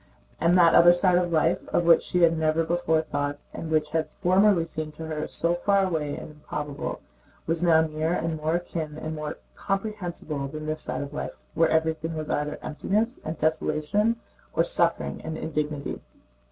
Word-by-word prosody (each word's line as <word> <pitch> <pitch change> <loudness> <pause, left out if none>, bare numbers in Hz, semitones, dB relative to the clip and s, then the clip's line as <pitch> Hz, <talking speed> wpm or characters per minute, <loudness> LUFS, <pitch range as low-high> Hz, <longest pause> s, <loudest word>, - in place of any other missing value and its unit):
And 175 +2 +4
that 170 -2 +6
other 175 +1 +8
side 180 0 +3
of 175 -1 -1
life, 165 +3 +1
of 175 - +2
which 165 -1 +6
she 180 -1 0
had 165 0 +5
never 160 0 +1
before 160 -1 +1
thought 145 -1 -2 0.2
and 165 - -6
which 155 -1 +1
had 160 0 0
formerly 185 -1 +3
seemed 155 -2 -6
to 160 - -7
her 155 -1 -3
so 170 +1 0
far 195 +2 +2
away 155 -5 -2
and - - -8
improbable, 150 -1 -5 0.4
was 165 +1 0
now 165 -2 +5
nearer 160 +2 -1
and 165 -1 -1
more 155 +2 0
akin 160 -3 -4
and 155 0 -4
more 150 -1 -5 0.2
comprehensible 180 -8 -3
than 155 +2 -7
this 155 0 -3
side - - -3
of 140 +1 -8
life, - - -4 0.2
where 165 0 +3
everything 160 0 0
was 155 -1 -4
either 150 0 -1
emptiness 215 - -1
and 155 0 -4
desolation 155 +8 +1 0.4
or - - +4
suffering - - +1
and 160 0 -4
indignity. 150 -2 -3
160 Hz, 180 wpm, -26 LUFS, 155-175 Hz, 0.4 s, other